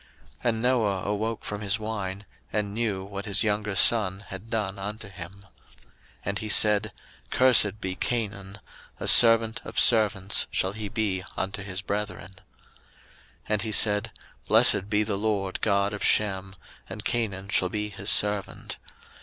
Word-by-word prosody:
01:009:024 - - -27 0.4
And 110 -1 -2
Noah 110 -7 0
awoke 105 +2 -3
from 105 0 -6
his 100 +1 0
wine, 105 -3 -6 0.3
and 105 -2 -2
knew 105 -4 -2
what 100 0 -7
his 100 +1 +2
younger 105 -1 -2
son 100 -3 +3
had 95 +4 -9
done 105 -4 -3
unto 105 +2 -6
him. 95 +1 -10
01:009:025 - - -16 0.8
And 100 0 -3
he 110 - -6
said, 105 -1 +4 0.4
Cursed 110 -5 +4
be 95 -2 -4
Canaan; 100 -3 -4 0.4
a - - -5
servant 115 -1 +7
of - - -3
servants 105 -4 +4
shall 95 - -1
he 105 -1 -6
be 100 -4 -2
unto 95 +1 -3
his 95 -1 -4
brethren. 100 -3 -5
01:009:026 95 -1 -19 1.1
And 105 -1 0
he 110 0 -4
said, 105 +1 +2 0.4
Blessed 100 - +4
be 105 0 +1
the 105 -2 -3
LORD 100 -3 -2
God 100 -1 0
of 105 - -6
Shem; 95 -2 0 0.3
and 105 +2 -8
Canaan 100 -5 -3
shall 90 -3 +1
be 105 +1 -4
his 100 0 -6
servant. 105 -1 0
105 Hz, 160 wpm, -25 LUFS, 95-110 Hz, 1.1 s, servant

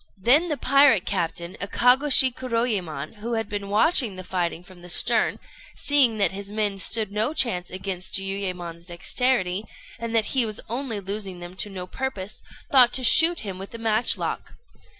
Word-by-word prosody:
Then 275 - +3
the 300 - -2
pirate 275 -8 +4
captain, 170 +1 -3
Akagôshi 255 +5 +4
Kuroyémon, 220 - -3
who 230 +3 -5
had 225 -2 -2
been 205 -1 -6
watching 225 - +2
the 185 - -8
fighting 175 -2 -3
from 180 -1 -16
the 180 - -11
stern, - - +1 0.4
seeing 270 -6 +2
that 200 -5 +2
his 200 +1 -7
men 205 -2 -2
stood 215 +1 +2
no 215 +9 -2
chance 190 - 0
against 185 0 -1
Jiuyémon's 185 -3 -3
dexterity, 195 +2 -1 0.4
and 230 0 -4
that 220 -2 +3
he 260 -2 +3
was 215 -2 -3
only 235 -2 -4
losing 195 -1 -5
them 175 +1 -10
to 205 - -1
no 185 -2 -7
purpose, 205 -3 -6 0.3
thought 250 -3 +5
to 260 - +1
shoot 330 +7 +6
him 195 -4 -7
with 195 +4 -9
a - - -6
matchlock. 225 0 -1
210 Hz, 170 wpm, -23 LUFS, 185-245 Hz, 0.4 s, shoot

